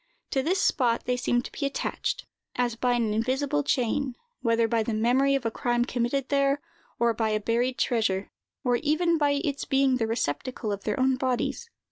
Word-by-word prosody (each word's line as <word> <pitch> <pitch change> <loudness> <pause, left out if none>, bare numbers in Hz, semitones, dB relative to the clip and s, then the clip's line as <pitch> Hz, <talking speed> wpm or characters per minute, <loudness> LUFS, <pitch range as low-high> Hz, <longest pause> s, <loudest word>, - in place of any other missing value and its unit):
To 270 - +2
this 355 +7 +1
spot 240 -9 +2
they 250 - +1
seem 245 0 +1
to - - -8
be - - -6
attached, 275 0 -2 0.3
as 245 -2 0
by 245 +1 +1
an 230 -3 +1
invisible 265 +6 0
chain, 265 -1 0 0.3
whether 230 -1 +2
by 230 0 +1
the 220 0 -2
memory 255 +5 +3
of 270 -3 -2
a 225 - +1
crime 240 +1 0
committed 250 +2 -1
there, 275 0 +2 0.4
or 235 0 +2
by 220 -1 0
a 215 0 +1
buried 235 +4 0
treasure, 210 -5 0 0.3
or 245 -1 +2
even 320 +4 +1
by 290 -1 +3
its 280 -4 -2
being 270 -1 +2
the 225 -2 0
receptacle 225 - -2
of 200 -1 -5
their 210 +2 -1
own 260 0 +3
bodies. 260 - -1
245 Hz, 190 wpm, -27 LUFS, 230-275 Hz, 0.4 s, memory